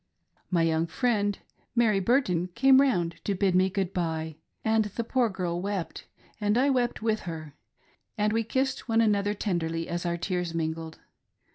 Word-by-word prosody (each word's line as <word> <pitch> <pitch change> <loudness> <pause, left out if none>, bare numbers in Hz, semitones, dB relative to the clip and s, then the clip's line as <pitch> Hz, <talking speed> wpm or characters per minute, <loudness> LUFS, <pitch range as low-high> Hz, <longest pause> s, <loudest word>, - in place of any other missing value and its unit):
My 170 -3 +2
young 165 0 +1
friend, 205 +2 0 0.4
Mary 225 -4 +3
Burton, 185 -6 +1
came 265 +2 +6
round 175 -12 0
to 200 - -1
bid 190 0 +2
me 185 +1 +4
good 190 -1 -2
bye; 160 -3 -2 0.3
and 220 0 +3
the 210 +3 -4
poor 240 0 +1
girl 175 -3 -3
wept, 195 -3 -4 0.3
and 210 +1 +1
I 275 +3 +3
wept 245 -4 0
with 220 -1 +1
her, 155 -3 -7 0.6
and 210 0 +1
we 225 0 +1
kissed 260 +2 -2
one 225 0 +3
another 205 -2 +2
tenderly 165 -5 -2
as 170 0 -3
our 170 -1 -1
tears 175 -1 -2
mingled. 160 0 -3
195 Hz, 165 wpm, -27 LUFS, 170-225 Hz, 0.6 s, came